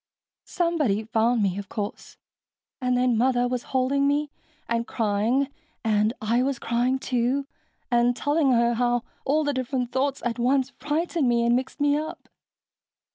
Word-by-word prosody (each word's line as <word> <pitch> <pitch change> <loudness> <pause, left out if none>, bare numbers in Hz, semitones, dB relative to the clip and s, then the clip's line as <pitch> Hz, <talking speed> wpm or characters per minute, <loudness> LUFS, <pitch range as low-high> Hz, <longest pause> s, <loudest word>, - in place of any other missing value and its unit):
"Somebody 305 - 0
found 225 +1 +1
me, 195 0 0
of 200 -1 -8
course. 205 -2 -6 0.6
And 250 -1 +1
then 245 -2 +2
Mother 245 0 +2
was 250 -1 -2
holding 275 +2 +2
me 290 +1 0 0.4
and 235 0 -1
crying 225 +5 +1 0.4
and 215 -1 +2
I 230 +3 +1
was 270 0 0
crying, 240 +3 0
too, 260 +2 0 0.5
and 240 0 +3
telling 290 +1 +2
her 235 -1 +3
how 240 0 +1 0.2
all 300 +3 +2
the 290 -1 0
different 255 -1 -2
thought 275 +1 0
at 240 0 -2
once 260 +2 +2
frightened 300 0 -1
me 235 0 +2
and 235 0 +4
mixed 260 +3 -3
me 290 0 +3
up. 315 +2 -6
250 Hz, 155 wpm, -25 LUFS, 235-275 Hz, 0.6 s, and